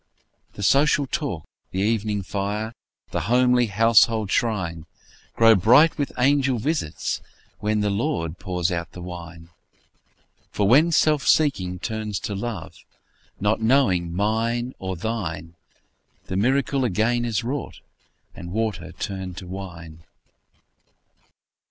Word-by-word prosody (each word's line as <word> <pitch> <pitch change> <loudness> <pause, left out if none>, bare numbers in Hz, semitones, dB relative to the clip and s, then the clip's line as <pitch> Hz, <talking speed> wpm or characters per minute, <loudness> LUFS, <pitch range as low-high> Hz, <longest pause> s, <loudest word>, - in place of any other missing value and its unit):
The 100 - -7
social 140 +6 +4
talk, 130 - -3 0.2
the 95 - -2
evening 105 -1 0
fire, 105 +5 -3 0.4
The - - -1
homely 125 0 +4
household 110 0 +3
shrine, 85 -8 -1 0.5
Grow 115 0 +7
bright 125 - +5
with 140 - -1
angel 135 0 +3
visits, 135 - -2 0.4
when 105 0 0
The 105 -1 +1
Lord 85 -5 -2
pours 90 -1 -1
out 85 -1 -4
the 90 - -9
wine. 85 -2 -9 1.0
For 100 - 0
when 150 +10 +5
self 155 -2 +2
seeking 95 -13 +2
turns 110 +1 -3
to 105 - -4
love, 100 -3 -5 0.6
Not 105 +2 +1
knowing 110 -9 +2
mine 115 +6 -1
nor 95 0 -4
thine, 90 -4 -4 0.7
The 95 - -4
miracle 130 +5 +1
again 120 +2 +1
is 115 -1 -1
wrought, 135 +2 -4 0.5
And 85 0 -9
water 100 -4 -2
turned 95 0 -5
to - - -7
wine. 85 -4 -9
105 Hz, 120 wpm, -23 LUFS, 90-120 Hz, 1.0 s, Grow